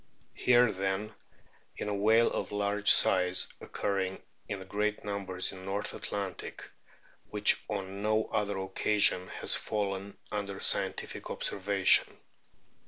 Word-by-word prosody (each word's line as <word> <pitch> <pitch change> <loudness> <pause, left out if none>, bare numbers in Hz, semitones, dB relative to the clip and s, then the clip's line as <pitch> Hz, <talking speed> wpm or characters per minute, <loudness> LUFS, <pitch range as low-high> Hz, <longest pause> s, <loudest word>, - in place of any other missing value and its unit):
Here, 125 -2 +4
then, 95 +2 -3 0.6
is - - -4
a 105 - -1
whale 110 +3 +3
of - - -3
large 105 0 0
size, 90 -1 +4
occurring 95 -2 -3 0.3
in 95 -2 -5
great 105 +2 -2
numbers 95 -3 0
in 95 - -9
the 95 - -11
North 100 +2 -3
Atlantic, 100 -4 -6 0.6
which - - +2
on 95 +1 -4
no 110 +1 +1
other 100 -1 -1
occasion 95 0 +2
has - - 0
fallen 100 -1 -2
under 100 -2 -4
scientific - - 0
observation." 100 0 +2
100 Hz, 120 wpm, -30 LUFS, 95-105 Hz, 0.6 s, Here